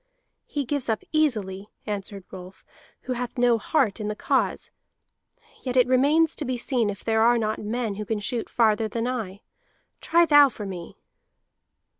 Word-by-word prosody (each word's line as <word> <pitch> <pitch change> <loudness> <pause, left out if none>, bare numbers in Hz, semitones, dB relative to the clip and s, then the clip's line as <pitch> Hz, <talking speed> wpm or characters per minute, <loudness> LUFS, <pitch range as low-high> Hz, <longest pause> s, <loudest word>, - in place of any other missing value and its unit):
"He 285 -2 -3
gives 280 -1 -2
up 220 - -1
easily," 210 -11 0 0.2
answered 200 -2 -5
Rolf, 185 0 -11 0.4
"who 255 - -3
hath 245 +1 -5
no 240 -2 +3
heart 240 -4 +1
in 210 - -3
the 210 - -3
cause. - - -1 0.9
Yet 255 -1 -3
it 250 - +6
remains 285 +6 +3
to - - -3
be 255 -2 -2
seen 235 -3 0
if 200 -1 -6
there 220 -1 +1
are 240 +1 +5
not 215 -1 -1
men 225 0 -2
who 210 +2 -6
can 220 +1 -1
shoot 230 +3 -3
farther 220 -2 +2
than 230 +2 -3
I. 220 -6 -4 0.6
Try 340 +1 +3
thou 290 -3 +7
for 210 -4 -8
me." 180 -3 -8
230 Hz, 170 wpm, -25 LUFS, 210-255 Hz, 0.9 s, thou